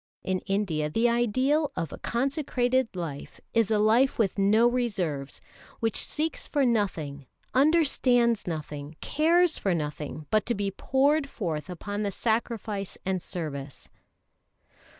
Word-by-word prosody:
In 185 -1 -1
India 180 -7 0
the 225 +10 +2
ideal 255 +6 +2
of 165 - -3
a - - -8
consecrated 260 -2 0
life 160 -6 -6
is 230 -3 +3
a 215 - +3
life 225 +6 +3
with 200 -3 +1
no 215 +4 +5
reserves 185 - -2 0.4
which 225 -2 0
seeks 315 +2 0
for 285 -3 +1
nothing, 160 - -1 0.3
understands 255 - +3
nothing, 150 -2 -5
cares 330 +2 +2
for 190 -3 +1
nothing 150 -1 -4
but 215 -1 +3
to 240 - +1
be 200 -1 -1
poured 280 +7 +1
forth 165 - -4
upon 205 +4 -4
the 205 - 0
sacrifice 220 -2 -2
and 190 -1 -1
service. 140 -6 -6
215 Hz, 130 wpm, -27 LUFS, 170-250 Hz, 0.4 s, no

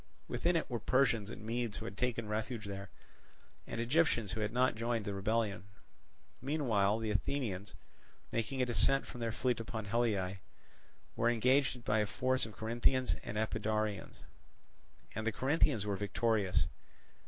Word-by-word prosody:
Within 170 +9 +1
it 165 - +1
were 120 -3 -2
Persians 120 -3 +2
and 105 -1 -8
Medes 115 -1 -2
who - - -6
had 95 - -6
taken 115 -1 -1
refuge 110 +1 -3
there, 100 -1 -6 0.8
and 115 - -4
Egyptians 120 - +2
who 110 - -3
had 105 0 0
not 125 +2 +3
joined 115 -1 -1
the 100 - -2
rebellion. 100 -1 0 0.8
Meanwhile 115 -8 +2
the 110 -1 -2
Athenians, 105 -3 -2 0.6
making 125 +3 0
a - - +2
descent 135 +3 +3
from 125 - -9
their 115 -1 0
fleet 125 +1 0
upon 110 -1 -4
Haliae, 100 -4 0 0.8
were 120 - +3
engaged 125 +1 +2
by 110 0 +2
a 105 - +1
force 130 +1 +1
of 110 - -12
Corinthians 120 +3 +2
and 105 - -4
Epidaurians; 110 -1 -1 0.9
and 110 +1 -3
the - - +3
Corinthians 130 -4 +2
were 100 -2 -1
victorious. 105 -3 +1
115 Hz, 155 wpm, -34 LUFS, 105-125 Hz, 0.9 s, not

